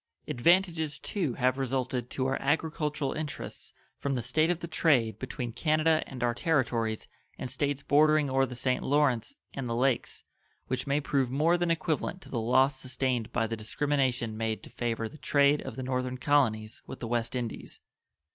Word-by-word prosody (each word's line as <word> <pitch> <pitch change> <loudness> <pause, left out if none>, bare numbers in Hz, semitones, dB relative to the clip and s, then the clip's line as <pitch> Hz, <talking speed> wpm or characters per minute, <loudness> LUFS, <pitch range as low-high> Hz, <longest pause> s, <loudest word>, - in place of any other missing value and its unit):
Advantages, 165 +1 +2
too, 160 - -2
have 130 +1 +1
resulted 130 -2 -1
to 130 - -2
our 135 0 0
agricultural 150 -1 0
interests 155 -2 -6 0.3
from 140 -1 -1
the 120 - -2
state 155 +7 +2
of 175 -2 +1
the 170 - -5
trade 135 -9 +2
between 125 -2 -4
Canada 155 +5 +2
and 125 -3 -6
our 120 -1 +2
Territories 120 -7 0 0.3
and 130 - -5
States 140 +1 -1
bordering 150 +1 +4
or 135 0 +2
the 125 - -7
St. 125 +1 0
Lawrence 145 - +1 0.2
and 135 -3 -4
the 115 - -1
Lakes 125 0 0 0.4
which 130 +1 -3
may 140 +1 +2
prove 135 -3 +1
more 155 +6 +3
than 175 -1 0
equivalent 165 +2 -1
to - - -13
the 120 - -2
loss 130 +4 +3
sustained 130 -3 -2
by 115 - +1
the 115 +1 -3
discrimination 125 0 0
made 110 -1 -2
to - - -11
favor 115 -2 -2
the 150 - -13
trade 140 +1 +3
of - - -7
the 130 - -5
northern 130 0 -2
colonies 115 -6 +1
with - - -8
the 115 - -4
West 120 +1 -1
Indies. 120 -3 -5
130 Hz, 180 wpm, -29 LUFS, 120-150 Hz, 0.4 s, bordering